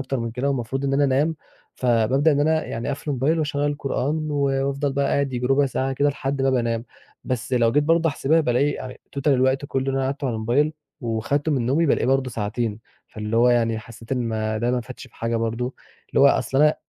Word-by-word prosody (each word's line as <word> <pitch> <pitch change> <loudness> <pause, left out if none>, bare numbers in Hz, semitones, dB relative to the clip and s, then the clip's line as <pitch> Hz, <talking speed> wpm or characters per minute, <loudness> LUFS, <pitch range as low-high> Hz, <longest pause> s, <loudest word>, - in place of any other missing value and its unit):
أكتر 135 -1 -2
من 115 0 -3
كده 125 +4 -2
والمفروض 135 0 -2
إن 135 - 0
أنا 140 +1 +3
أنام، 145 +4 +1 0.4
فبابدأ 130 +5 +2
إن 145 - +1
أنا 155 +1 +2
يعني 115 - -4
أقفل 145 +2 -3
الmobile 140 +5 +1
وأشغّل 145 -2 0
القرآن 145 +2 -2
و 145 - -1 0.3
وأفضل 140 0 -1
بقى 140 0 +1
قاعد 140 -1 0
ييجي 125 0 -1
رُبع 140 +1 +3
ساعة 135 +1 -1
كده 145 +2 +2
لحد 135 -1 -2
ما 135 - +3
بقى 130 -2 +2
أنام. 115 0 -2 0.4
بس 130 +1 -3
لو 115 -2 +3
جيت 145 +1 +3
برضه 165 +1 +3
أحسبها 155 +3 +2
بالاقي 140 +1 +1
آآ 130 0 -7 0.2
total 140 - -1
الوقت 130 0 +2
كُلّه 135 -1 -2
اللي 135 - 0
أنا 135 - 0
قعدته 140 +1 -2
على 115 - -2
الmobile 130 +8 +1 0.3
وخدته 130 +6 -1
من 125 -5 0
نومي، 155 +6 +2
بالاقيه 135 - +2
برضه 135 0 +1
ساعتين، 110 0 -2 0.3
فاللي 110 +1 -4
هو 120 +1 +5
يعني 115 -2 +2
حسّيت 115 +2 -9
إن 130 - +1
ما 110 -1 -1
ده 120 +2 0
ما 125 - 0
فادش 125 +2 -10
بحاجة 115 0 -3
برضه. 115 +3 -2 0.4
اللي - - +2
هو 140 - +8
أصل 135 -1 +2
أنا 150 0 +5
135 Hz, 225 wpm, -23 LUFS, 120-145 Hz, 0.4 s, هو